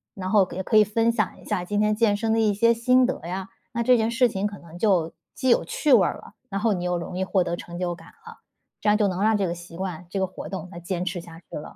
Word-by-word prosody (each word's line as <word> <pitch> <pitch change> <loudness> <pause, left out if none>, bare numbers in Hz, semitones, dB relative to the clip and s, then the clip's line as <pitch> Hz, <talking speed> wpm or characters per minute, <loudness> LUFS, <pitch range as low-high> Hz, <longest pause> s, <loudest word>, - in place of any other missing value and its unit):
然 185 -1 -4
后 200 -4 +5
也 190 - -4
可 215 - +3
以 215 - +8
分 225 +3 +1
享 215 -4 -2
一 - - -16
下 180 - -1
今 205 +3 -2
天 210 0 +2
健 210 -2 +2
身 225 0 0
的 225 - +2
一 210 -2 +2
些 230 +3 +4
心 250 +2 +4
得 260 - -2
呀， 190 +1 -4 0.2
那 235 0 -1
这 250 0 +5
件 220 0 +1
事 240 +1 +3
情 200 0 -1
可 205 -1 -8
能 170 +1 -13
就 180 -7 +2 0.2
既 260 -1 0
有 - - +4
趣 295 -4 +1
味 205 -6 +7
儿 - - 0
了， - - -14 0.2
然 195 0 -2
后 220 0 +2
你 180 -1 -3
又 180 0 0
容 170 +1 -6
易 190 - -1
获 190 -1 +1
得 170 0 -2
成 175 0 -9
就 175 -1 -1
感 175 - -13 0.2
了， - - -11 0.4
这 210 - +2
样 210 - +4
就 210 -2 +2
能 185 +1 -2
让 215 0 +3
这 195 - 0
个 170 - -1
习 170 -1 -11
惯、 180 -3 -5
这 195 - -3
个 190 - +2
活 185 - -8
动 185 -2 -6
能 175 - -8
坚 180 +1 -3
持 180 -1 -3
下 165 -1 -12
去 - - -12
了。 150 - -8
195 Hz, 325 characters per minute, -25 LUFS, 180-220 Hz, 0.4 s, 以